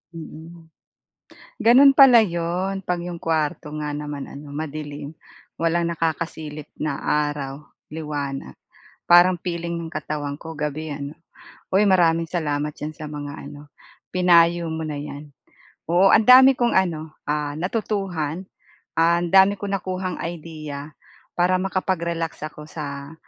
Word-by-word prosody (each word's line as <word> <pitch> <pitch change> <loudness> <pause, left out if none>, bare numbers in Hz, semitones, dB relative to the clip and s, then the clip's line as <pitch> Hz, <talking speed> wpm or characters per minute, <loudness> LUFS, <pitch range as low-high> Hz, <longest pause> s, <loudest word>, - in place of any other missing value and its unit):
Mm. 160 0 -11 0.9
Gano'n 265 +5 +7
pala 270 -3 +8
'yon 185 0 -1
'pag 180 -1 -2
yung 175 -1 -7
kwarto 155 -2 -1
nga 150 -1 -3
naman 145 -1 -5
ano 145 +1 -10
madilim, 150 0 -6 0.4
walang 170 +1 0
nakakasilip 160 -2 -3
na 145 -3 -3
araw, 145 -1 -2 0.3
liwanag 145 -3 -5 0.5
parang 175 +1 +6
feeling 170 -1 -3
ng 165 -1 -6
katawan 145 -2 -4
ko 160 0 -8
gabi, 150 +1 -3
ano. 140 0 -6 0.6
Oy, 200 +2 +4
maraming 165 -3 +3
salamat 150 -3 -2
diyan 150 - -5
sa 155 -1 -9
mga 145 -1 -6 0.2
ano, 145 0 -12 0.4
pinayo 175 -1 +4
mo 160 0 -4
na 150 -2 -4
'yan. 145 0 -8 0.6
Oo 180 +4 +4
ang 220 - +5
dami 260 +1 +8
kong 240 -1 +2
ano, 160 -4 0
ah, 150 0 -2
natutuhan, 185 -3 -2 0.6
ang 170 +1 +3
dami 195 +2 +6
kong 200 0 -3
nakuhang 185 0 -4
idea 155 -3 -7 0.5
para 185 +1 +3
makapag-relax 170 -3 -2
ako 150 0 -10
sa 145 -1 -7
165 Hz, 130 wpm, -23 LUFS, 150-180 Hz, 0.9 s, pala